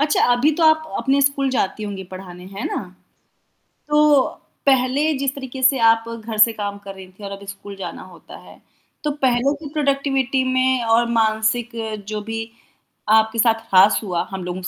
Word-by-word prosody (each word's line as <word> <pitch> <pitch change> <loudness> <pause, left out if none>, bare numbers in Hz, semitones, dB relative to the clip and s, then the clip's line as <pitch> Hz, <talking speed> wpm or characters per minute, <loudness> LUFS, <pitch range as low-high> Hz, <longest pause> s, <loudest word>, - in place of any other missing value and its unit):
अच्छा, 295 0 +2
अभी 245 +5 +3
तो 335 - -1
आप 315 0 +5
अ, - - -7
अपने 275 +1 +1
स्कूल 275 0 +1
जाती 215 -4 -1
होंगी 200 -2 -5
पढ़ाने, 180 -1 -10
है 195 +2 -7
ना? - - -3 1.1
तो, 300 -2 +4 0.4
पहले 275 +3 +2
जिस 275 0 -1
तरीके 265 -1 -7
से 265 +1 +5
आप 225 0 +3
घर 225 -1 -6
से 225 +2 +6
काम 205 -2 -4
कर 200 -1 -9
रही 190 -1 -11
थी 195 +3 -16
और 200 - -6
अब 200 0 -9
स्कूल 200 0 -9
जाना 195 - -7
होता - - -14
है, - - -16 0.4
तो 300 - 0
पहले 265 -1 +1
की 295 - -6
प्रोडक्टिविटी 275 -3 0
में 255 -1 +2
और 230 +1 +3
मानसिक 225 +1 +1 0.4
जो 215 0 -4
भी, 225 +1 -5 0.6
आपके 220 +1 +3
साथ 225 0 +2
हास 190 +3 +6
हुआ, 180 -4 -2
हम 190 -1 -5
लोगों 180 +1 -5
के 180 - -4
230 Hz, 190 wpm, -20 LUFS, 205-270 Hz, 1.1 s, से